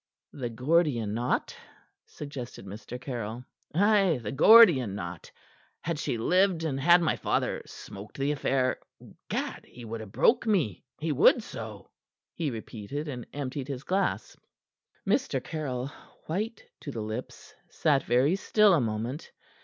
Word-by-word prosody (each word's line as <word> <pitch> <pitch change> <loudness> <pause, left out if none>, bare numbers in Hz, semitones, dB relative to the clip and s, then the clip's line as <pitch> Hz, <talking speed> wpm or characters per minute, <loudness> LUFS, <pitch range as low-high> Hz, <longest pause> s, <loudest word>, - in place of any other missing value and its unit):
"The 125 -4 -4
Gordian 125 -3 +1
knot?" 120 +3 -1 0.5
suggested 135 -8 -8
Mr. 110 +5 -8
Caryll. 120 -2 -5 0.3
"Ay 195 -5 +4
the 105 - -3
Gordian 140 - +7
knot. 85 -4 -7 0.5
Had 160 -1 -3
she 120 - -1
lived 180 - +2
and 140 -4 -1
had 175 +5 +6
my 160 - +2
father - - -1
smoked 100 +2 -10
the 140 +1 0
affair 135 -3 0 0.5
Gad! - - -3
he 120 -1 -12
would 115 0 -5
ha' 110 - -8
broke 235 - +3
me; 155 - +1 0.2
he 155 +1 -1
would 140 - +5
so!" - - -8 0.4
he 160 -4 -2
repeated, 115 +5 -6
and 125 -5 -6
emptied 140 -1 -4
his 135 -2 -5
glass. 190 +3 -1 0.7
Mr. 200 - +1
Caryll, 135 -4 -4 0.4
white 215 +8 -3
to - - -8
the 115 -5 -4
lips, 110 +1 -7 0.2
sat 145 -4 +2
very 130 +8 +2
still 210 +1 +4
a 160 - +4
moment. 115 +5 -3
135 Hz, 140 wpm, -28 LUFS, 120-165 Hz, 0.7 s, Gordian